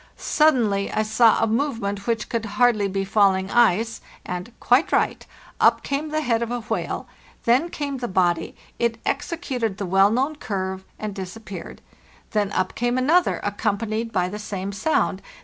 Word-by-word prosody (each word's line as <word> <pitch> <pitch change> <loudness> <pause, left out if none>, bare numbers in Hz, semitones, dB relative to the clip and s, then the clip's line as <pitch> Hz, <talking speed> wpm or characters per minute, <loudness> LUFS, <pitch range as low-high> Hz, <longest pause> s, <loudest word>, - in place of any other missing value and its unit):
Suddenly 235 -10 +2
I 215 - +1
sawa 225 +1 +4
movement 220 -5 -1
which 230 -2 0
could 230 -2 -2
hardly 235 -5 +4
be 195 0 -2
falling 195 -1 +2
ice, 225 -1 +3 0.2
and—quite 230 - 0
right—up - - 0
came 285 +3 -2
the 310 0 -1
head 230 -3 +1
of 235 - -2
a 245 0 -2
whale; 220 - -3 0.4
then 255 +9 +3
came 285 -4 -4
the 245 - -3
body; 175 -4 +1 0.2
it 235 -1 +1
executed 265 - -2
the 200 - -3
well 195 +2 +4
known 270 +7 0
curve, 190 -6 -4
and 215 -1 -4
disappeared. 190 -1 -8 0.5
Then 205 -2 0
up 185 0 0
came 240 +1 0
another, 320 +8 +3
accompanied 215 +2 -1
by 180 -4 +1
the 205 +3 -6
same 200 -2 -4
sound. 200 -4 0
220 Hz, 150 wpm, -23 LUFS, 195-245 Hz, 0.5 s, sawa